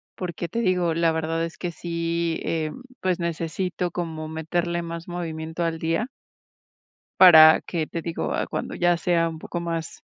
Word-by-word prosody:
porque 175 Hz, -1 st, -4 dB
te 230 Hz, +7 st, -2 dB
digo, 180 Hz, -5 st, +1 dB
la 165 Hz, 0 st, +3 dB
verdad 160 Hz, +1 st, -1 dB
es 165 Hz, -, -9 dB
que 175 Hz, -, -2 dB
sí, 170 Hz, 0 st, -2 dB
em, 160 Hz, +7 st, -2 dB, 0.2 s
pues, 185 Hz, -1 st, 0 dB
necesito 170 Hz, +2 st, -2 dB
como 160 Hz, -3 st, -4 dB
meterle 170 Hz, +2 st, -2 dB
más 170 Hz, 0 st, -6 dB
movimiento 165 Hz, -1 st, -4 dB
al 165 Hz, -1 st, -1 dB
día 165 Hz, +9 st, 0 dB, 1.1 s
para 160 Hz, -4 st, +9 dB
que, 160 Hz, -3 st, -2 dB
te 165 Hz, -, -4 dB
digo, 165 Hz, 0 st, -3 dB
ah, -, -, -1 dB
cuando -, -, -4 dB
ya 175 Hz, -1 st, +2 dB
sea 170 Hz, -1 st, +1 dB
un 160 Hz, -1 st, -8 dB
poco 175 Hz, -, -5 dB
más, 165 Hz, -2 st, -4 dB
170 Hz, 165 wpm, -24 LUFS, 160-175 Hz, 1.1 s, para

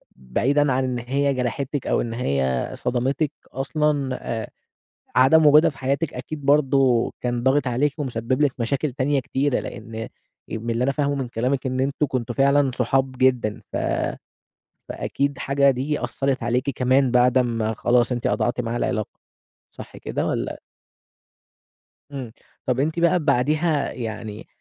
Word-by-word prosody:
بعيدًا 135 Hz, -, +1 dB
عن 130 Hz, +1 st, +1 dB
إن 125 Hz, -1 st, -2 dB
هي 140 Hz, +4 st, 0 dB
جرحتِك 130 Hz, +2 st, -2 dB
أو -, -, +2 dB
إن 115 Hz, -1 st, -4 dB
هي 70 Hz, -, -1 dB
صدمتِك 135 Hz, +4 st, 0 dB, 0.2 s
أصلًا 140 Hz, 0 st, 0 dB, 0.3 s
آآ -, -, -9 dB, 0.7 s
عدم 150 Hz, +5 st, +6 dB
وجودها 150 Hz, +2 st, +7 dB
في 140 Hz, -, -17 dB
حياتِك 140 Hz, +4 st, -1 dB
أكيد 145 Hz, +3 st, -6 dB
برضه 135 Hz, -4 st, +3 dB
كان 120 Hz, -1 st, -2 dB
ضاغِط 135 Hz, +2 st, +2 dB
عليكِ 135 Hz, +4 st, +1 dB
ومسبب 130 Hz, -1 st, -1 dB
لِك 145 Hz, -3 st, +3 dB
مشاكل 135 Hz, +4 st, 0 dB
تانية 135 Hz, +2 st, +1 dB
كتيرة، 135 Hz, +1 st, 0 dB
لأن 115 Hz, -1 st, -8 dB
آآ 110 Hz, 0 st, -4 dB, 0.4 s
من 115 Hz, +1 st, -4 dB
اللي 115 Hz, +2 st, 0 dB
أنا 140 Hz, -, +1 dB
فاهمة 145 Hz, 0 st, 0 dB
من 135 Hz, -3 st, -3 dB
كلامِك 125 Hz, +4 st, -1 dB
إن 130 Hz, 0 st, -1 dB
أنتم 140 Hz, +2 st, 0 dB
كنتم 130 Hz, -3 st, -3 dB
فعلًا 140 Hz, 0 st, +3 dB
صحاب 130 Hz, +2 st, +1 dB
جدًا 125 Hz, -5 st, +2 dB
ف -, -, -3 dB, 1.1 s
فأكيد 140 Hz, -1 st, -2 dB
حاجة 140 Hz, +1 st, +3 dB
دي 135 Hz, +1 st, -2 dB
أثّرت 135 Hz, +3 st, -1 dB
عليكِ 125 Hz, +3 st, 0 dB
كمان 130 Hz, +1 st, +2 dB
بعد 125 Hz, +1 st, +4 dB
أمّا 115 Hz, -3 st, 0 dB
خلاص 120 Hz, +2 st, +2 dB
أنتِ 120 Hz, -1 st, -2 dB
قطعتِ 120 Hz, 0 st, 0 dB
معاها 120 Hz, 0 st, -2 dB
العلاقة، 110 Hz, -3 st, -1 dB, 0.6 s
صح -, -, -11 dB
كده -, -, -3 dB
والّا؟ -, -, -2 dB, 1.5 s
إمم، 130 Hz, -5 st, -6 dB, 0.3 s
طب 125 Hz, 0 st, 0 dB
أنتِ 155 Hz, +4 st, 0 dB
بقى 170 Hz, +1 st, +3 dB
بعديها 150 Hz, +1 st, +1 dB
يعني 110 Hz, -2 st, -6 dB
130 Hz, 150 wpm, -23 LUFS, 120-140 Hz, 1.5 s, وجودها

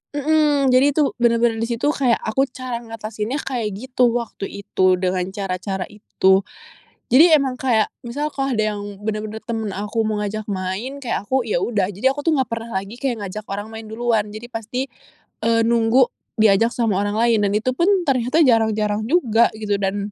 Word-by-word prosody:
Mhm, 295 Hz, -2 st, +2 dB
jadi 275 Hz, +2 st, +4 dB
tuh 300 Hz, -3 st, +2 dB
bener-bener 230 Hz, -1 st, +3 dB
di 230 Hz, -, 0 dB
situ 235 Hz, +5 st, 0 dB
kayak 255 Hz, -6 st, +2 dB
aku 270 Hz, +4 st, +1 dB
cara 255 Hz, -2 st, -5 dB
ngatasinnya 225 Hz, +2 st, -5 dB
kayak 240 Hz, -5 st, -2 dB
gitu 250 Hz, +2 st, +1 dB
waktu 235 Hz, -4 st, -4 dB, 0.2 s
itu, 185 Hz, -1 st, +2 dB
dengan 185 Hz, 0 st, 0 dB
cara-cara 190 Hz, -1 st, -3 dB
itu. 190 Hz, -2 st, +2 dB, 0.7 s
Jadi 320 Hz, +7 st, +7 dB
emang 270 Hz, -3 st, 0 dB
kayak 230 Hz, -5 st, +1 dB
misalkan 275 Hz, +2 st, -3 dB
ada 215 Hz, -1 st, 0 dB
yang 205 Hz, -, -6 dB, 0.2 s
bener-bener 215 Hz, 0 st, -4 dB
temen 225 Hz, -3 st, -3 dB
aku 210 Hz, +3 st, -2 dB
mau 215 Hz, -1 st, -1 dB
ngajak 210 Hz, +1 st, -3 dB
main, 195 Hz, +8 st, -3 dB
kayak 240 Hz, -6 st, -3 dB
aku 260 Hz, -2 st, +1 dB
ya 175 Hz, -, +1 dB
udah 205 Hz, -6 st, 0 dB
jadi 210 Hz, +8 st, +1 dB
aku 290 Hz, +1 st, -7 dB
tuh 325 Hz, -, +4 dB
nggak 265 Hz, -, 0 dB
pernah 230 Hz, 0 st, -5 dB
lagi 195 Hz, +4 st, -10 dB
kayak 240 Hz, -7 st, -2 dB
ngajak 210 Hz, +3 st, -6 dB
orang 205 Hz, +2 st, -4 dB
main 220 Hz, 0 st, -8 dB
duluan 225 Hz, -1 st, 0 dB
jadi 220 Hz, +3 st, -8 dB
pasti, 245 Hz, +4 st, -4 dB, 0.6 s
eee, 230 Hz, 0 st, +3 dB
nunggu 235 Hz, +2 st, +4 dB, 0.3 s
diajak 215 Hz, +1 st, +4 dB
sama 225 Hz, -6 st, 0 dB
orang 205 Hz, 0 st, -1 dB
lain 230 Hz, -1 st, +3 dB
dan 200 Hz, -, +1 dB
itu 225 Hz, +4 st, +1 dB
pun 340 Hz, +7 st, +1 dB, 0.2 s
ternyata 260 Hz, +3 st, +2 dB
jarang-jarang 220 Hz, -3 st, +2 dB
juga 235 Hz, -9 st, +3 dB
gitu 205 Hz, -2 st, -1 dB
dan 200 Hz, +1 st, -2 dB
225 Hz, 180 wpm, -21 LUFS, 210-255 Hz, 0.7 s, Jadi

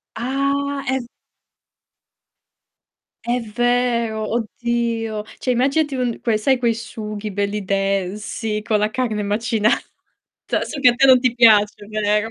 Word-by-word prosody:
Ah, 275 Hz, +3 st, -1 dB
è 265 Hz, 0 st, +1 dB
v 240 Hz, -, -9 dB, 2.2 s
è 245 Hz, +1 st, 0 dB
vero, 235 Hz, -1 st, 0 dB
oddio. 230 Hz, -1 st, -2 dB, 0.2 s
Cioè 255 Hz, -, 0 dB
immaginati 275 Hz, +4 st, +1 dB
un 245 Hz, -3 st, -2 dB
quei 225 Hz, -3 st, +1 dB
sai 260 Hz, +4 st, +2 dB
quei 235 Hz, -2 st, +1 dB
sughi 215 Hz, -2 st, -6 dB
belli 200 Hz, 0 st, -2 dB
densi 200 Hz, +3 st, -2 dB
con 210 Hz, 0 st, 0 dB
la 210 Hz, -, +1 dB
carne 215 Hz, -3 st, -2 dB
macinata. 215 Hz, +1 st, +1 dB, 0.8 s
So 285 Hz, -, -6 dB
che 255 Hz, -, +5 dB
a 240 Hz, -, +1 dB
te 270 Hz, -, +4 dB
non 260 Hz, -1 st, +7 dB
ti 250 Hz, -1 st, +1 dB
piace, 210 Hz, -3 st, +4 dB
vero? 210 Hz, 0 st, 0 dB
230 Hz, 130 wpm, -20 LUFS, 210-250 Hz, 2.2 s, non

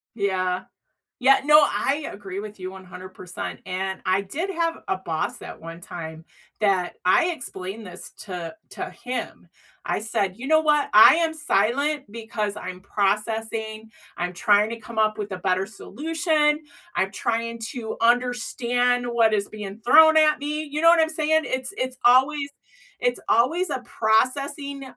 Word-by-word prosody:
Yeah. 185 Hz, -3 st, -1 dB, 0.6 s
Yeah, 270 Hz, +2 st, +5 dB
no, 300 Hz, +1 st, +7 dB
I 290 Hz, +1 st, 0 dB
agree 195 Hz, -1 st, -7 dB
with 210 Hz, 0 st, -8 dB
you 185 Hz, -, -5 dB
100%, 185 Hz, -1 st, -8 dB
and 190 Hz, +1 st, -3 dB
I 185 Hz, +1 st, +2 dB
did 310 Hz, -, -4 dB
have 335 Hz, -2 st, -1 dB
a -, -, +1 dB
boss 160 Hz, -4 st, -3 dB
at -, -, -9 dB
one 165 Hz, +1 st, -9 dB
time 160 Hz, -4 st, -8 dB, 0.4 s
that 190 Hz, -4 st, +1 dB
I 335 Hz, -, +4 dB
explained 210 Hz, -, -7 dB
this 180 Hz, 0 st, -9 dB
to 180 Hz, -5 st, -6 dB
to -, -, -6 dB
him. 250 Hz, +1 st, -6 dB, 0.3 s
I -, -, -1 dB
said, 200 Hz, -2 st, -2 dB
"You 265 Hz, -, -6 dB
know 315 Hz, +1 st, +5 dB
what? 300 Hz, -2 st, +2 dB
I 215 Hz, -, +9 dB
am 330 Hz, -1 st, +1 dB
silent 285 Hz, +1 st, 0 dB
because 215 Hz, -2 st, -4 dB
I'm 185 Hz, -3 st, -7 dB
processing. 220 Hz, +2 st, -2 dB, 0.3 s
I'm 180 Hz, 0 st, -2 dB
trying 205 Hz, +4 st, +3 dB
to 230 Hz, 0 st, -6 dB
come 230 Hz, 0 st, -11 dB
up 215 Hz, -1 st, +2 dB
with 205 Hz, -2 st, -5 dB
a 185 Hz, -, -5 dB
better 185 Hz, +1 st, 0 dB
solution. 305 Hz, -, 0 dB, 0.4 s
I'm 190 Hz, 0 st, 0 dB
trying 230 Hz, -1 st, -2 dB
to 225 Hz, -4 st, -5 dB
understand 245 Hz, 0 st, +1 dB
what 235 Hz, -2 st, +2 dB
is 205 Hz, -1 st, 0 dB
being 210 Hz, 0 st, -8 dB
thrown 315 Hz, +4 st, +7 dB
at 305 Hz, -1 st, +4 dB
me." 300 Hz, +2 st, -3 dB
You 300 Hz, -, -2 dB
know 330 Hz, -, +5 dB
what 335 Hz, -1 st, +6 dB
I'm 315 Hz, -, +2 dB
saying? 315 Hz, 0 st, +1 dB
It's 260 Hz, +8 st, -3 dB
it's 255 Hz, 0 st, -3 dB
always 280 Hz, +4 st, +4 dB, 0.5 s
it's -, -, 0 dB
always 330 Hz, +11 st, +2 dB
a -, -, -2 dB
processing, 275 Hz, +5 st, 0 dB
230 Hz, 160 wpm, -24 LUFS, 195-290 Hz, 0.6 s, I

